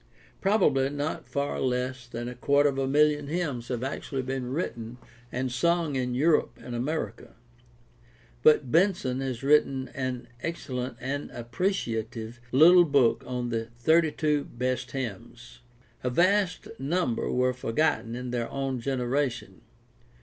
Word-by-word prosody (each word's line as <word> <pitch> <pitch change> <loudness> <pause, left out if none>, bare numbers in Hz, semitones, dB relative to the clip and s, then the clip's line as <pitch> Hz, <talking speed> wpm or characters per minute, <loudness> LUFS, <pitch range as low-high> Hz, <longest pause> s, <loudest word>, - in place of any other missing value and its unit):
Probably 165 -10 +3
not 145 +2 -3
far 140 0 -2
less 125 -1 -1
than 120 0 -5
a 125 - -5
quarter 140 +4 +3
of 135 -1 -3
a 135 - 0
million 150 +1 +3
hymns 145 -7 -2
have 125 -1 -3
actually 135 0 -3
been 130 -1 -3
written 120 -6 -4 0.3
and 130 0 -2
sung 165 +2 +1
in 125 -1 -1
Europe 155 +5 +2
and 125 - -8
America. 125 -1 -3 1.1
But 145 -3 +5
Benson 165 -8 +2
has 130 -2 -3
written 135 -2 +3
an 130 -2 -4
excellent 130 -7 -4
and 140 +3 -3
appreciative 120 - -3
little 175 +6 +8
book 140 -6 +3
on 125 -1 -2
the 115 -1 -1
thirty 160 +5 +4
two 150 -1 0
best 125 +1 -2
hymns! 120 -1 -7 0.4
A 125 - +1
vast 180 +7 +2
number 140 -3 0
were 125 0 +2
forgotten 115 -2 0
in 125 0 -5
their 120 -1 -2
own 135 -2 -2
genera 130 +2 0
tion. 95 -6 -11
130 Hz, 140 wpm, -27 LUFS, 125-150 Hz, 1.1 s, little